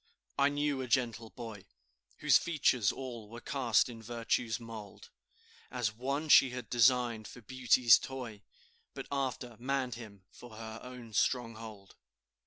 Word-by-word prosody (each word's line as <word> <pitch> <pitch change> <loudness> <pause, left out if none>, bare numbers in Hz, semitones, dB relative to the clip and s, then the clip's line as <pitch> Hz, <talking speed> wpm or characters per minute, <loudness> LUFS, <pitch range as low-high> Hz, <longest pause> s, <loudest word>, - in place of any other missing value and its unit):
I 140 0 +4
knew 145 -1 -1
a 130 - -4
gentle 120 -2 0
boy, 110 -5 -9 0.6
Whose - - +5
features 130 - +3
all 120 -5 -7
were 120 +1 -9
cast 125 -5 +2
in 115 -2 -9
Virtue's 115 0 -1
mould, 110 -3 -10 0.6
As 120 -5 -1
one 140 +7 -2
she 135 -3 +7
had 125 0 -7
designed 120 -2 +3
for 125 - -11
Beauty's 125 0 +5
toy, 125 -6 -7 0.5
But - - -6
after 130 -4 -3
manned 130 0 -1
him 105 -4 -10
for 120 -3 -13
her 110 0 -7
own 125 -3 -10
stronghold. 110 -5 -2
120 Hz, 140 wpm, -32 LUFS, 110-130 Hz, 0.6 s, she